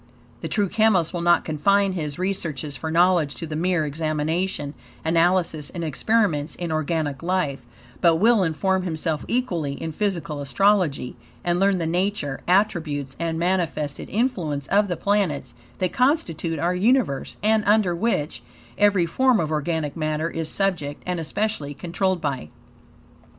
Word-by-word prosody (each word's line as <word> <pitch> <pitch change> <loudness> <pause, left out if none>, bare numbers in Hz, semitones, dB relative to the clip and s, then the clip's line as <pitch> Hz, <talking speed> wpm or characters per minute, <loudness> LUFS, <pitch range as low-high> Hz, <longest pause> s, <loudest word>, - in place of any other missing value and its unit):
The - - -4
true 205 -2 +1
chemist 195 -5 +2
will 175 - -2
not 175 0 +3
confine 195 +5 +2
his 150 -5 -4
researches 165 -6 -2
for 160 +5 -5
knowledge 170 -4 +3
to 120 - -6
the 155 -1 -5
mere 175 0 +1
examination, 155 +1 -2 0.3
analysis, 165 -2 +2
and 170 -2 -5
experiments, 165 -2 0
in 175 -2 -4
organic 155 -2 -1
life; 165 -8 -1 0.3
but 170 -2 +5
will 220 +5 +4
inform 190 +3 +1
himself 160 -3 -1
equally, 175 - -1
in 160 +3 -5
physical 170 -5 -2
astrology; 175 -3 +1 0.3
and 175 0 +1
learn 195 0 +3
the 170 - -2
nature, 175 -4 -1
attributes, 160 -8 +1
and 165 -1 -1
manifested 170 -4 -1
influences 175 - -1
of 205 +1 +3
the 175 -3 -2
planets, 200 -8 0 0.2
that 185 -2 -1
constitute 180 - +1
our 170 +4 +1
universe; 210 - +1
and, 215 0 +3
under 205 -4 +3
which, 160 - -1 0.4
every 205 -4 +4
form 255 +7 +3
of 155 -1 -1
organic 155 -1 -1
matter 155 0 -1
is 165 -1 -3
subject, 170 -8 -1
and 180 -1 -2
especially, 165 -4 -2
controlled 175 +4 -1
by. 135 - -3
170 Hz, 145 wpm, -23 LUFS, 155-195 Hz, 0.4 s, but